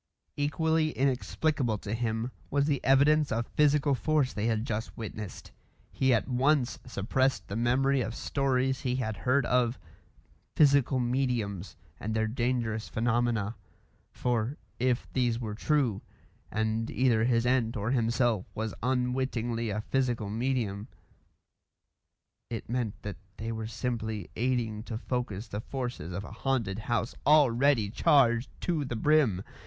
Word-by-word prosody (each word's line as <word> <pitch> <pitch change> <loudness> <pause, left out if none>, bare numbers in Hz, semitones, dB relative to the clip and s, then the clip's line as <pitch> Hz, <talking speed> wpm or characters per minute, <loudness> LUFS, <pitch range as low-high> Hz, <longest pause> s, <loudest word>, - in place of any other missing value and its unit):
Equally 155 +2 +1
inexplicable 135 -2 0
to 105 +1 -5
him 115 +1 -1 0.2
was 140 0 +2
the 145 -3 0
evidence 145 +3 +4
of 115 +1 0
physical 145 -1 +4
force 145 -1 +1
they 105 +2 -1
had 110 0 0
just 110 -1 -4
witnessed. 105 -2 -7 0.4
He 130 -1 +2
at 115 - +2
once 130 +1 +2
suppressed 125 -1 0
the 100 - -5
memory 130 +4 +2
of 115 +1 -3
stories 135 -1 0
he 125 -2 0
had 110 -4 -2
heard 130 +1 +2
of 125 0 +2 0.8
"physical 140 -3 +4
mediums" 120 -6 -1 0.2
and 110 +2 -3
their 110 0 +2
dangerous 115 -1 -1
phenomena; 115 -2 0 0.6
for 120 +2 -1 0.2
if 125 0 +1
these 120 -3 +1
were 110 -3 -4
true, 125 -2 +1 0.5
and 110 +1 -1
either 120 -3 +2
his 120 -1 +2
aunt 120 -3 +1
or 105 +4 -1
himself 115 -4 +1
was 110 0 -3
unwittingly 125 -2 -1
a 105 +1 -2
physical 120 -4 -1
medium, 115 -3 -1 1.6
it 115 -2 -5
meant 120 -3 -2
that 100 -5 -5 0.2
they 115 +1 -4
were 110 -1 -4
simply 110 -4 -3
aiding 115 -3 0
to 115 -1 -5
focus 120 -4 -3
the 105 0 -4
forces 120 - -5
of 100 +3 -4
a - - -9
haunted 110 -4 -1
house 115 -1 0
already 140 -5 +5
charged 120 -1 +3
to 165 -4 0
the 130 -3 -4
brim. 120 -7 +3
120 Hz, 140 wpm, -29 LUFS, 110-130 Hz, 1.6 s, already